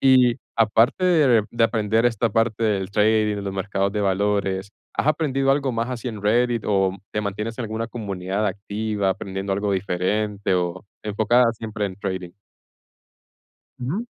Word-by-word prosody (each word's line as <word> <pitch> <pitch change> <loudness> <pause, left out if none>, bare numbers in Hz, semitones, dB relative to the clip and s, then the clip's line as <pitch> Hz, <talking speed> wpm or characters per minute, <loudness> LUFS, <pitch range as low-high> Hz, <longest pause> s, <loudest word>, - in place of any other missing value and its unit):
Y 130 -3 +5 0.2
aparte 115 - +3
de 140 - +4
de 115 -1 +2
aprender 110 +1 +2
esta 115 -1 +1
parte 115 +1 +1
del 100 -3 0
trading, 105 0 +2
los 100 - -4
mercados 95 0 -1
de 105 - -1
valores. 100 0 0 0.3
¿Has - - +1
aprendido 135 -3 +1
algo 135 -1 +1
más 115 +2 -2
así 125 -1 -4
en 110 -4 -7
Reddit 120 +2 +2
o 95 -2 +2
te 105 - -1
mantienes 105 +3 -4
en 125 - -2
alguna 110 +1 -3
comunidad 100 -3 -3
activa 100 0 -2
aprendiendo 95 +1 -3
algo 100 +1 -1
diferente 100 +2 0
o 90 +1 -2 0.2
enfocada 115 +3 +3
siempre 110 -2 -4
en 95 -2 -7
trading? 95 -3 -4 1.5
Ujú. 155 - -3
105 Hz, 150 wpm, -23 LUFS, 100-115 Hz, 1.5 s, Y